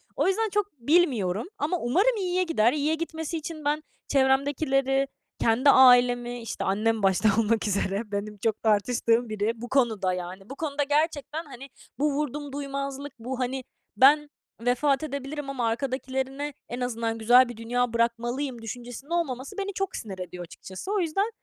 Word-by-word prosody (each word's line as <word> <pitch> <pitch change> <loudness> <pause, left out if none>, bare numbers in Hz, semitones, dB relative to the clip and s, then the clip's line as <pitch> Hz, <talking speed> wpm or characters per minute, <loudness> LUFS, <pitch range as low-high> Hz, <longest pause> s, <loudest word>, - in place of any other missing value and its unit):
O - - +1
yüzden 435 +3 +1
çok 410 0 -1
bilmiyorum 235 - +2
ama 315 +5 0
umarım 385 - +2
iyiye 365 -1 +1
gider. 250 -10 +2
İyiye 300 +1 +1
gitmesi 320 0 -4
için 310 -1 -7
ben 300 +1 0 0.2
çevremdekileri, 270 0 +2 0.3
kendi 235 +5 +3
ailemi, 245 -2 +5
işte, 230 - -4
annem 215 +2 +1
başta 195 +3 +4
olmak 225 0 +2
üzere 200 +2 -1
benim 205 +1 -4
çok 220 +1 -1
tartıştığım 230 +2 +2
biri 215 +1 0
bu 240 +1 -8
konuda, 220 -8 +2
yani. 180 +2 -7
Bu 275 - -7
konuda 290 -1 -1
gerçekten, 300 +1 0
hani, 275 -1 -10 0.3
bu 295 0 +2
vurdumduymazlık, 280 -1 -4
bu, 250 +3 -5
hani, 260 +1 -2 0.3
ben 295 +3 +6 0.3
vefat 255 +4 +2
edebilirim 280 -1 -5
ama 250 -4 -1
arkadakilere 265 +3 -2 0.2
en 245 +2 -5
azından 230 -2 -2
güzel 240 +3 +6
bir 240 - -8
dünya 245 +1 -1
bırakmalıyım 240 +2 -1
düşüncesinde 245 +6 -7
olmaması 305 - -2
beni 400 0 -3
çok 390 0 -2
sinir 195 -5 -6
ediyor 180 -1 -6
açıkçası. 185 - -8
O 415 - +1
yüzden, 380 +5 0
260 Hz, 155 wpm, -26 LUFS, 230-295 Hz, 0.3 s, ben